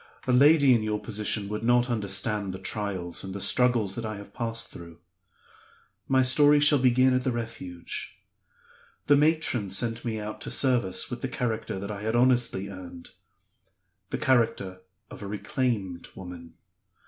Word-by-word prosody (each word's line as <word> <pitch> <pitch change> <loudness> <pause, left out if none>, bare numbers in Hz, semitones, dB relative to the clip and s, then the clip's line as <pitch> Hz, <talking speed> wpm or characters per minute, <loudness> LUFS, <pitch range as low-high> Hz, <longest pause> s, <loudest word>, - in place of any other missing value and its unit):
"A 130 - +1
lady 140 +1 +6
in 115 - +2
your 105 -1 -2
position 105 -1 -2
would 105 0 -4
not 120 +1 +3
understand 100 -2 0
the - - -5
trials 95 -2 -4
and 95 0 -7
the - - -4
struggles 120 -2 +3
that 115 - -5
I 110 -1 -4
have 100 0 -12
passed 115 -1 -4
through. 85 -1 -12 1.1
My 130 -1 +3
story 145 +3 +5
shall 145 -1 +5
begin 130 +1 +4
at 130 0 +1
the 130 - 0
Refuge. 110 -7 -6 0.9
The 145 - +5
matron 145 -8 +1
sent 115 +4 -1
me 110 -2 -3
out 105 0 -7
to - - -5
service 120 -9 +1
with 120 -1 -5
the - - -2
character 120 -6 -3
that 100 +2 -5
I 100 -1 -6
had 110 +2 -1
honestly 120 -5 +2
earned 90 -3 -10 1.0
the - - -2
character 105 -7 0 0.3
of - - -10
a 100 - -6
reclaimed 100 -2 -2
woman. 85 -3 -10
110 Hz, 160 wpm, -27 LUFS, 100-125 Hz, 1.1 s, lady